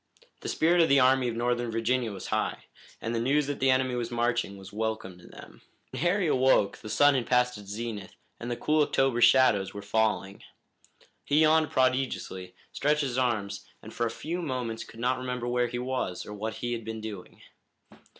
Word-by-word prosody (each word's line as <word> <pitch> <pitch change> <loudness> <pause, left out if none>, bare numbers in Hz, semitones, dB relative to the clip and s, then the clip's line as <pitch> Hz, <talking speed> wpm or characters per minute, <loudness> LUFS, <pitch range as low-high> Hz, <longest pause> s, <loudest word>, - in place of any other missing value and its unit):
The - - -5
spirit 170 +2 +3
of 165 - +3
the 140 0 +6
Army 130 0 +4
of 120 - -2
Northern 120 0 0
Virginia 115 +1 0
was 95 -2 -8
high, - - -1 0.4
and 115 - -3
the 115 - 0
news 140 +4 +2
that 145 0 -4
the 135 - +2
enemy 130 -1 +2
was 120 -1 -2
marching 120 -4 -1
was 95 0 -12
welcome 110 -4 -3
to 90 - -15
them. - - -14 0.3
When - - -5
Harry 180 +3 +2
awoke 130 -8 +3
the 110 - -9
sun 145 +7 +5
had 125 -4 -1
passed 125 0 +2
its 100 -1 -12
zenith 105 -2 -6 0.2
and 120 - -6
the 120 - -2
cool 155 0 +2
October 135 -4 +1
shadows 120 -6 +4
were 100 - -6
falling. 105 -2 0 0.8
He 145 +2 +2
yawned 155 0 +4
prodigiously, 130 -8 -1 0.2
stretched 150 +2 +1
his 130 -3 -1
arms, 105 -6 -1 0.2
and 110 - -10
for 120 - 0
a - - -3
few 170 +9 -4
moments 125 -7 -3
could 115 - -14
not 125 +2 0
remember 125 -1 -4
where 120 0 +1
he 120 +1 -5
was, 125 -7 -3
or 105 - -8
what 110 +2 -4
he 120 0 -3
had 115 -1 -4
been 110 0 -5
doing. 105 -4 -9
120 Hz, 200 wpm, -28 LUFS, 110-130 Hz, 0.8 s, the